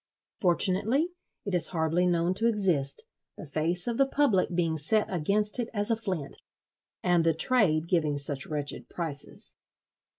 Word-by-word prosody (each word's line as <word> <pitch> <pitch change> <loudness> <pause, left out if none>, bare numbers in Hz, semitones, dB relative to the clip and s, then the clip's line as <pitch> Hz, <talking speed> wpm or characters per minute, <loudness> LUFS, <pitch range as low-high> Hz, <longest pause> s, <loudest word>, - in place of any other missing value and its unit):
Fortunately 200 - +2 0.4
it 200 - -4
is 170 -2 +5
hardly 165 +1 0
known 170 0 +1
to 225 +5 0
exist: 190 - 0 0.3
the 195 - -9
face 160 +4 -1
of 235 0 -3
the 275 - +4
public 270 -10 +1
being 170 -2 0
set 160 +8 +1
against 205 +7 +1
it 240 - -2
as 205 +2 -1
a - - +3
flint—and 175 -2 -4
the 165 -1 +2
trade 170 -8 +3
giving 155 -5 0
such 140 -1 +3
wretched 145 -2 -3
prices. 155 -5 -6
175 Hz, 145 wpm, -27 LUFS, 160-210 Hz, 0.4 s, is